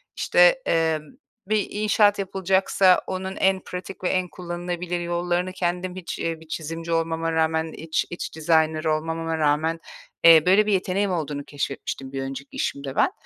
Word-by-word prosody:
İşte, - - +4
eee, 160 -1 +2 0.5
bir 215 0 +1
inşaat 210 -1 +3
yapılacaksa 190 -1 +2
onun 190 0 -4
en 190 0 +2
pratik 185 +1 -8
ve 180 - +1
en 185 -1 0
kullanılabilir 175 0 -4
yollarını, 175 +1 -1
kendim 180 0 -2
hiç, 185 -2 -6
eee, 165 -1 -2
bir 160 - -16
çizimci 165 +1 -5
olmama 165 0 0
rağmen, 160 0 0
iç 160 0 -2
iç 175 - -6
designer 160 -1 +2
olmamama 160 +1 -1
rağmen, 155 +2 +1 0.4
eee, 165 -2 +8
böyle, 195 +4 +5
bir 210 - +1
yeteneğim 195 +1 0
olduğunu 150 -4 -3
keşfetmiştim 135 -1 -5
bir 135 -1 -4
önceki 135 +1 -7
işimde 140 -1 -3
ben. - - +3
170 Hz, 155 wpm, -24 LUFS, 160-185 Hz, 0.5 s, eee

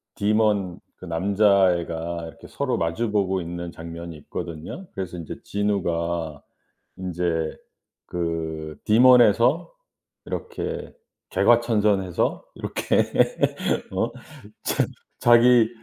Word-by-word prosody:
Demon 105 -3 +1 0.2
그 - - -11
남자애가 85 -2 +1
이렇게 80 - -12
서로 - - -2
마주 95 +8 -1
보고 95 -2 +1
있는 85 0 -5
장면이 85 0 -8
있거든요. 85 - -7
그래서 90 -2 -4
인제 85 -3 -7
진우가 85 -6 -1 0.5
인제 85 -3 -2 0.5
그 80 -3 -3
Demon에서 125 - +5 0.5
이렇게 460 -1 -5 0.4
개과천선해서 105 -6 +2
이렇게 - - 0 0.9
어 - - -1 0.5
자 - - +1 0.4
자기 120 -1 +6
90 Hz, 235 characters per minute, -24 LUFS, 85-105 Hz, 0.9 s, 자기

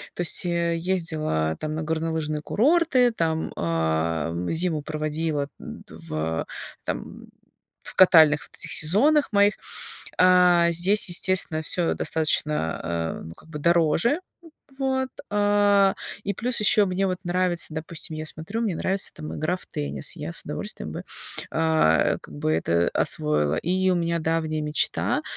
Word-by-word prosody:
то - - -3
есть, 175 - 0
э, 170 -1 0
ездила 160 - 0
там 155 0 -3
на 160 - -3
горнолыжные 160 -1 -2
курорты, 265 - +3
там, 160 -5 -2
а, 80 -1 -1 0.2
зиму 165 -2 0
проводила 155 -1 -2
в, 80 +1 -5 0.4
там, - - -6 0.6
в - - -8
катальных 160 -5 +6
вот - - -20
этих - - -4
сезонах 275 - +3
моих. 205 0 +4 0.7
Э, 180 -2 +5
здесь, 200 +6 +4
естественно, 175 -3 +3
всё 170 +2 -1
достаточно, 150 - 0
э, 85 -1 -3
ну, 80 - -10
как 160 - -19
бы 150 - -6
дороже, 170 - +2 0.6
вот, 265 -1 -1 0.2
э, 205 -1 +3 0.3
и 200 - -2
плюс 240 +4 -1
ещё 210 -1 +5
мне 190 +1 0
вот 185 -1 -2
нравится, 175 -2 -1
допустим, 160 0 -4
я 155 - -5
смотрю, 160 +9 -5
мне 200 -6 -1
нравится, 190 +3 -1
там, 155 - -8
игра 165 +4 -1
в - - -13
теннис, 70 -1 -5
я - - -6
с - - -5
удовольствием - - -5
бы, - - -7 0.5
э, 160 - +2
как - - -13
бы 75 - -1
это 85 +2 +1
освоила. 75 0 +1
И 185 +2 0
у - - +3
меня 170 0 -1
давняя 160 -1 -1
мечта- 150 -1 +1
165 Hz, 145 wpm, -24 LUFS, 150-185 Hz, 0.7 s, катальных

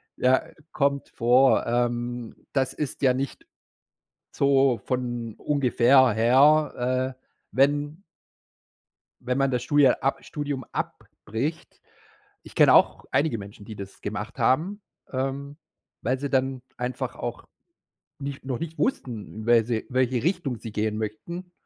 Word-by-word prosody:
Ja, 130 +1 +3 0.3
kommt 140 -1 0
vor. 125 +3 +4
Ähm, 120 0 -1 0.2
das 135 -2 +1
ist 145 -2 -4
ja 130 -2 +4
nicht 135 +1 -4 0.9
so 135 -3 +3
von 120 -3 -3
ungefähr 130 -2 +4
her, 130 +2 +3
äh, 130 - -42 0.3
wenn 145 +5 +1 1.2
wenn 125 +2 -1
man 135 -1 +2
das 125 -2 -1
Studie 145 -2 +5
ab 135 +2 +1
Studium 145 -3 -4
abbricht. 140 +10 -5 0.6
Ich - - -14
kenne - - +6
auch - - +4
einige 135 -2 +1
Menschen, 100 0 -10
die 110 - -8
das 100 0 -9
gemacht 105 +3 -5
haben, 160 - +1 0.3
ähm, 135 +2 -3 0.5
weil 130 +3 0
sie 140 - -3
dann 130 -1 0
einfach 125 0 -4
auch - - -5 0.8
nicht 140 -1 -6
noch 130 -3 -3
nicht 165 -1 -6
wussten, 115 - -3
wer 115 -2 +5
sie 115 -2 -2
welche 130 -2 +1
Richtung 155 - -1
sie 115 - -7
gehen 105 0 -1
möchten 170 - -6
130 Hz, 130 wpm, -25 LUFS, 120-140 Hz, 1.2 s, kenne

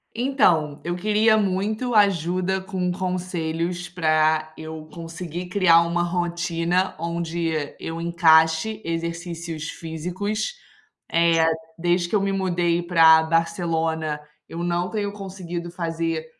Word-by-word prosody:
Então, 175 - +2
eu 175 +1 -2
queria 215 +3 +3
muito 215 +5 -1
ajuda 190 -2 +2
com 185 -2 -2
conselhos 175 -1 -3
para 155 -2 +1
eu 160 0 -8
conseguir 170 +1 -6
criar 180 -3 +5
uma 170 +1 0
rotina 175 +1 -1
onde 170 0 -2 0.3
eu 165 +1 -5
encaixe 170 +4 +3
exercícios 165 -1 -4
físicos. 180 - -4 0.6
Eh, 165 -1 +4 0.3
desde 175 +1 +1
que - - 0
eu 205 - +3
me 195 0 0
mudei 175 -3 0
para 165 -2 +6
Barcelona, 160 -2 0 0.3
eu 170 +1 -5
não 175 +1 -1
tenho 205 -2 -2
conseguido 185 -4 -6
fazer 165 -2 -2
170 Hz, 115 wpm, -23 LUFS, 165-185 Hz, 0.6 s, para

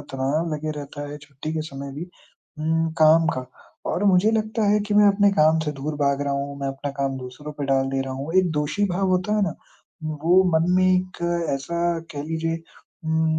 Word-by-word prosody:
तनाव 145 +5 -1
लगे 155 +1 -3
रहता 145 0 -7
है 145 - -6
छुट्टी 145 +1 -7
के 160 - -1
समय 140 -1 -7
भी 150 +5 -5 0.5
उम, 160 +1 +1
काम 160 +1 +6
का 130 - -3 0.5
और 205 - -1
मुझे 195 +2 +5
लगता 220 0 0
है 210 0 +3
कि 205 - 0
मैं 210 0 +7
अपने 200 0 +4
काम 155 -1 +4
से 150 - -2
दूर 145 +2 -4
भाग 140 0 +2
रहा 140 0 -1
हूँ, 140 0 -3
मैं 140 - -1
अपना 135 +1 -4
काम 135 -1 0
दूसरों 130 +4 -8
पे 145 -1 -4
डाल 135 -1 +2
दे 135 0 0
रहा 135 0 -5
हूँ। 140 +5 -5
एक 185 -3 +3
दोषी 150 +7 0
भाव 190 +2 0
होता 185 +3 +1
है 210 - +2
ना? 180 -5 0 0.5
वो 160 +4 +3 0.2
मन 170 +2 +1
में 185 - +4
एक 185 0 -1 0.4
ऐसा 170 +5 -1
कह 145 -1 -4
लीजिए 165 +1 -2 0.5
उम, 160 0 +1
155 Hz, 210 wpm, -23 LUFS, 140-175 Hz, 0.5 s, मैं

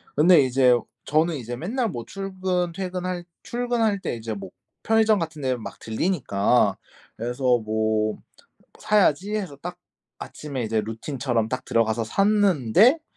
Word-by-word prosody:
근데 160 +2 +6
이제 130 -1 +4 0.3
저는 160 +2 +2
이제 120 -1 -5
맨날 225 - -2
뭐 120 -8 -5
출근 185 0 -2
퇴근할 180 -1 -4 0.2
출근할 235 -4 0
때 120 - -3
이제 115 -1 -5
뭐 100 -2 -7 0.3
편의점 220 -1 +3
같은 160 -3 -5
데를 130 -2 0
막 110 - -9
들르니까 110 - +1 0.4
그래서 120 +1 +1
뭐 110 0 0 0.6
'사야지.' 205 -1 +2
해서 185 -9 -4
딱 180 +1 -6 0.4
아침에 140 -5 -6
이제 110 0 0
루틴처럼 115 +1 -2
딱 130 0 -3
들어가서 115 0 +1
샀는데 200 - +3
150 Hz, 285 characters per minute, -24 LUFS, 115-190 Hz, 0.6 s, 근데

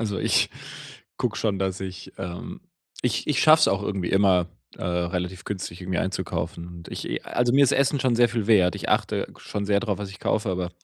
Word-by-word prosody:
Also 105 -4 -1
ich - - +2 0.7
gucke - - -1
schon, 100 -4 0
dass 95 0 -2
ich 95 -1 -7
ähm, 95 - -6 0.4
ich 115 -2 0
ich 150 -3 +1
schaffe 155 0 +7
es - - +5
auch 95 +1 +1
irgendwie 95 -4 -2
immer, 95 -3 +4 0.3
äh, - - -7
relativ 90 +1 -2
günstig 95 -3 -5
irgendwie 90 -1 -2
einzukaufen 90 -2 -3
und 85 -1 -10
ich - - -4
also, 120 0 +1
mir 140 +1 +6
ist - - +2
Essen 140 +1 +2
schon 125 -2 +2
sehr 120 0 +5
viel 115 -3 -2
wert. 95 -6 +5
Ich - - -6
achte - - 0
schon 100 -1 -4
sehr 100 -1 +3
drauf, 105 -4 -2
was 100 -2 -5
ich 95 - -12
kaufe, 105 -1 0
aber 90 -1 -2
95 Hz, 210 wpm, -25 LUFS, 90-115 Hz, 0.7 s, schaffe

